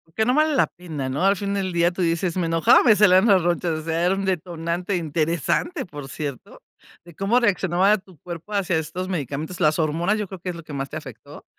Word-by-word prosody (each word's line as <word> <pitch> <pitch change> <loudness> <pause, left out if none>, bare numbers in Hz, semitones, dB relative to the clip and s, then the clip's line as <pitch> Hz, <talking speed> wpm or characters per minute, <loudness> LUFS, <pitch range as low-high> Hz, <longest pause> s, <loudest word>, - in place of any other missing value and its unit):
Que 220 - +1
no 250 - +2
vale 310 0 +3
la - - +3
pena, 155 -6 -6
¿no?, 145 +7 -2
al 195 +1 +4
fin 200 0 -3
del 195 -2 -2
día 170 0 +2
tú 185 - -5
dices: 170 +1 0
"Me 170 -2 0
enojaba, 165 -1 +5
me 220 -4 +6
salieron 200 0 +5
las 195 -4 +5
ronchas", 170 -1 0
o - - -8
sea, 165 +2 -1
era 180 - +3
un 195 0 -3
detonante 175 +1 -2
interesante, 165 - -1
por 145 -5 -9
cierto, 140 -4 -7 0.4
de 170 -2 -15
cómo 200 +7 +2
reaccionaba 195 -2 +2
tu 185 -3 -18
cuerpo 175 +4 -9
hacia 185 -4 +1
estos 160 +4 -4
medicamentos. 160 0 -4
Las 155 +1 +3
hormonas, 165 +6 +1
yo 210 - -3
creo 190 0 -9
que 180 +1 -5
es 175 - -4
lo 170 - -9
que 150 - -10
más 135 0 -4
te - - -5
afectó. - - -11
175 Hz, 235 wpm, -23 LUFS, 160-195 Hz, 0.4 s, me